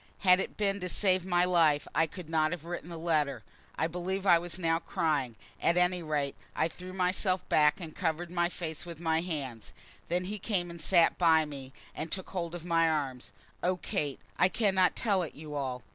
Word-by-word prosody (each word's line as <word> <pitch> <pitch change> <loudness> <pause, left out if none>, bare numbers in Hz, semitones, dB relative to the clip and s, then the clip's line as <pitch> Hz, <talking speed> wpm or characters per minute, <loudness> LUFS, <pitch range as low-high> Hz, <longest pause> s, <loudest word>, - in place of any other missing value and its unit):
Had 180 -1 +6
it - - -4
been 200 -1 0
to 180 -1 -3
save 185 -1 +2
my 175 -1 +3
life 165 -5 +3
I 165 - +3
could 180 +1 -9
not 155 -1 +2
have 175 -3 -5
written 175 -1 -5
the 170 - -6
letter. 155 -4 0 0.3
I - - 0
believe 180 +3 -3
I 175 -3 +6
was 175 +1 -4
now 165 -2 +1
crying, 145 -8 -1 0.3
at 170 - +3
any 180 0 +2
rate 150 -3 -1 0.2
I 160 - +1
threw 180 +3 -10
myself 185 0 0
back 150 +3 +4
and 165 -4 -8
covered 170 -1 -2
my 175 -1 +1
face 160 -3 -5
with 170 -2 -9
my 160 -1 +1
hands. 140 - -5 0.4
Then 180 +1 0
he 205 +3 -4
came 180 -4 -1
and 170 -1 -9
sat 170 +1 +4
by 160 -3 +5
me, 135 -3 -8 0.2
and 155 0 -5
took 190 -2 -5
hold 175 -2 -3
of 175 -1 -8
my 165 -1 +3
arms. 135 -5 -2 0.3
Oh, 180 +1 +1
Kate; 150 -8 -3 0.2
I 180 - +5
cannot 190 -3 +2
tell 200 -5 +1
it 165 - -5
you 150 0 -8
all. 130 -4 -3
170 Hz, 205 wpm, -30 LUFS, 155-180 Hz, 0.4 s, Had